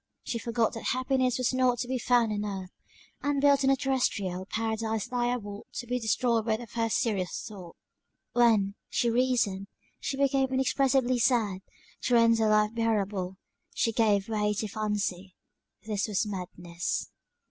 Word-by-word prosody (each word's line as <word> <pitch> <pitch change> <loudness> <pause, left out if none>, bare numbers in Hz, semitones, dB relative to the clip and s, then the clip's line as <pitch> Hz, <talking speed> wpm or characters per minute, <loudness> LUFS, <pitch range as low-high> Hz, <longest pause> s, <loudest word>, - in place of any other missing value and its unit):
She 230 - -3
forgot 230 -1 0
that 225 - -7
happiness 255 -1 +1
was 255 0 0
not 255 -1 +2
to 245 - -3
be 260 0 -1
found 240 -2 +3
on 205 0 -2
earth, 195 -3 -5 0.5
and 285 -1 0
built 280 -1 +4
a 270 0 +4
terrestrial 205 -9 -1
paradise 220 0 -2
liable 240 -4 -2
to 245 - -5
be 250 +1 -1
destroyed 230 0 +1
by 220 0 0
the 240 - -8
first 225 -2 -1
serious 195 -6 -1
thought: 185 -6 -10 0.6
when, 220 -5 +3 0.2
she 235 - +1
reasoned 230 -6 +1 0.3
she 270 - -3
became 270 -1 +2
inexpressibly 260 -1 +2
sad, 220 -6 +2 0.4
to 250 - +2
render 230 -1 +4
life 210 0 +3
bearable 205 -5 -1 0.4
she 230 - +1
gave 210 -3 +2
way 210 -1 0
to 215 - -2
fancy 200 -3 -3 0.5
this 210 -1 -1
was 210 0 0
madness. 175 -3 -4
225 Hz, 150 wpm, -28 LUFS, 205-250 Hz, 0.6 s, built